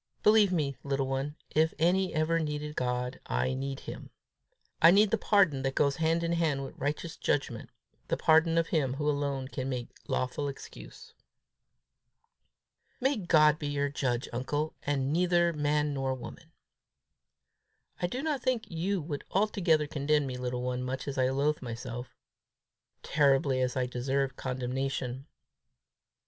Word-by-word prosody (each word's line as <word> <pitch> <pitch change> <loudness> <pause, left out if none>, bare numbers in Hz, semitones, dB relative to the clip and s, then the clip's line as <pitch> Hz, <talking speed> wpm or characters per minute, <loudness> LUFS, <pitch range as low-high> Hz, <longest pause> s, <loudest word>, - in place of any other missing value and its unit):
Believe 210 -2 +6
me, 145 -6 0
little 135 -1 0
one, 135 +2 -2 0.2
if 160 +1 +2
any 180 +3 +2
ever 160 +2 +1
needed 150 -1 -3
God, 125 0 -2
I 130 - 0
need 135 +1 -4
him. - - -8 0.7
I 165 - +9
need 205 +3 +5
the 225 - +3
pardon 190 -12 +3
that 135 0 -2
goes 140 -2 +2
hand 165 +1 +1
in 170 - 0
hand 160 -5 +1
with - - -9
righteous 150 +4 -3
judgment, 125 -5 -2 0.4
the - - 0
pardon 160 +1 +4
of 165 0 +2
him 135 -5 +1
who 150 +1 -2
alone 140 -2 -1
can 130 0 -4
make 125 -2 -3 0.2
lawful 130 +3 -1
excuse." 140 - -10 1.9
"May 270 +2 +2
God 155 -6 +4
be 145 - -3
your 145 0 0
judge, 130 -3 -1
uncle, 145 +5 -2
and 140 -1 -1
neither 175 0 +3
man 150 0 +1
nor 135 -1 -1
woman!" 125 - -10 1.5
"I 175 - +2
do 255 +10 -4
not 300 -5 -1
think 245 -5 -1
you 180 +4 -1
would 145 -2 -5
altogether 185 -6 +2
condemn 145 0 +1
me, 130 -2 -4
little 125 0 -3
one, 125 0 -2
much 130 +2 -4
as 135 -1 -3
I 130 0 +3
loathe 145 +3 0
myself 120 0 -6 1.0
terribly 135 -2 +3
as 125 +1 0
I 125 - +1
deserve 130 +2 -1
condemnation." 130 +1 -3
145 Hz, 150 wpm, -30 LUFS, 130-165 Hz, 1.9 s, I